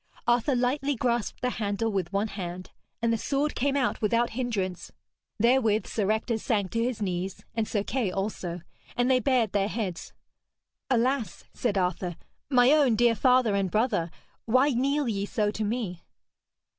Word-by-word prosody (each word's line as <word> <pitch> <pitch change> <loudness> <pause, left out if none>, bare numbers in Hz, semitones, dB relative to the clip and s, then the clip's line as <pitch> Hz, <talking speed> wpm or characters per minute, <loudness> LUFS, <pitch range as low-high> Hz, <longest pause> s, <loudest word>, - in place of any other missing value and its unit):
Arthur 245 +3 +2
lightly 270 +3 0
grasped 235 -2 -1
the 250 - 0
handle 205 +2 0
with 190 -3 -2
one 200 +2 0
hand, 185 -2 -6 0.3
and 230 0 +3
the 225 - -1
sword 285 +6 0
came 280 +2 0
out 260 -3 0
without 230 +2 +2
hindrance. 215 -7 -3 0.5
Therewith 230 -2 +3
Sir 210 -3 -1
Ector 220 +1 0
sank 205 -5 -1
to 230 0 0
his 235 -3 -2
knees, 185 0 -3
and 225 -1 -1
Sir 205 -2 -1
Kay 235 -3 -1
also. 180 -3 -3 0.4
And 245 +2 +3
they 255 - +4
bared 250 -5 +2
their 200 -1 +1
heads. 205 -6 -4 0.8
'Alas,' 255 -1 0
said 215 -5 -1
Arthur, 180 -1 -1 0.3
'my 250 -1 +5
own 285 -6 +4
dear 235 +1 +4
father 250 0 +3
and 195 -1 +1
brother, 210 -5 +1 0.4
why 255 +5 +4
kneel 275 +3 +1
ye 200 -3 -1
so 210 -1 0
to 215 - -3
me?' 205 -5 -3
225 Hz, 165 wpm, -27 LUFS, 200-250 Hz, 0.8 s, my